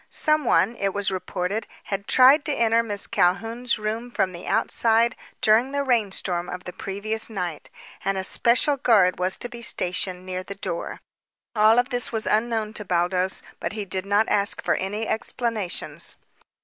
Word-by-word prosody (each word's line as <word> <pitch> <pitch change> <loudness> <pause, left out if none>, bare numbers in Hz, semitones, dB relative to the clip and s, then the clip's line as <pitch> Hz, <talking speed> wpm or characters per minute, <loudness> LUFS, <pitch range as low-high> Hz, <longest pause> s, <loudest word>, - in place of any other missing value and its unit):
Someone, 295 -8 +3
it 195 0 -1
was 205 -1 0
reported, 185 +3 -3 0.2
had 200 0 -4
tried 265 +4 +6
to 300 - +1
enter 230 -3 +2
Miss 205 -3 +1
Calhoun's 225 +7 0
room 220 +3 -4
from 195 -6 -1
the 175 -1 -9
outside 230 +1 +2 0.3
during 230 +5 +3
the 280 0 0
rainstorm 195 -8 0
of 180 0 -6
the 180 - -8
previous 215 +3 -3
night, 180 -7 -5 0.3
and 195 0 -1
a 190 - -2
special 240 +8 +3
guard 200 -9 +3
was 185 +1 +1
to 245 - -5
be 240 -1 -10
stationed 180 -3 -2
near 185 0 -4
the 200 +2 -8
door. 170 -3 -5 0.5
All 215 +1 +5
of 245 +2 +2
this 245 -3 +4
was 220 -2 -3
unknown 220 -1 0
to 210 - -5
Baldos, 180 0 0 0.2
but - - -4
he 210 -2 -4
did 190 0 -3
not 205 +2 +2
ask 200 0 +1
for - - +1
any 210 +4 -3
explanations. 220 -4 -2
210 Hz, 170 wpm, -24 LUFS, 190-235 Hz, 0.5 s, tried